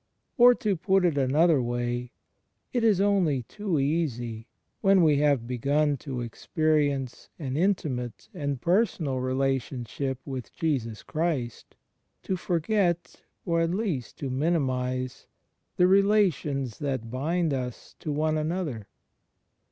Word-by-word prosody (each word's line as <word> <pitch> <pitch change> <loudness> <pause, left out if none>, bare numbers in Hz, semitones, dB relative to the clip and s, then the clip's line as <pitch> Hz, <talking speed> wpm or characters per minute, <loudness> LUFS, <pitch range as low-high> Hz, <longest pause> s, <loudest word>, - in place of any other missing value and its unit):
Or, 245 0 +7
to 210 -4 0
put 190 +2 +2
it 170 -4 +2
another 145 +3 +3
way, 120 0 -2 0.6
it 245 -2 +1
is 215 -5 +4
only 185 -10 +2
too 200 - -3
easy, 125 -6 -1 0.3
when 195 -3 +5
we 150 -3 +4
have 140 -5 +2
begun 140 +5 +1
to 130 -2 -5
experience 145 +1 -1
an 135 -5 -4
intimate 140 - -1
and 140 -2 -3
personal 170 - +1
relation 130 -1 -1
ship 130 +4 -3
with 130 -4 -6
Jesus 115 - -2
Christ, 150 - -3 0.5
to 190 - -1
forget, 175 0 0 0.2
or 170 -1 +1
at 165 - +1
least 185 - -3
to 135 -3 -4
minimize, 130 -4 -1 0.5
the 180 - +5
relations 185 - +2
that 130 -6 -3
bind 160 +5 0
us 125 -3 -5
to 155 - -4
one 155 +1 +1
another. 155 - -3
145 Hz, 125 wpm, -27 LUFS, 130-175 Hz, 0.6 s, Or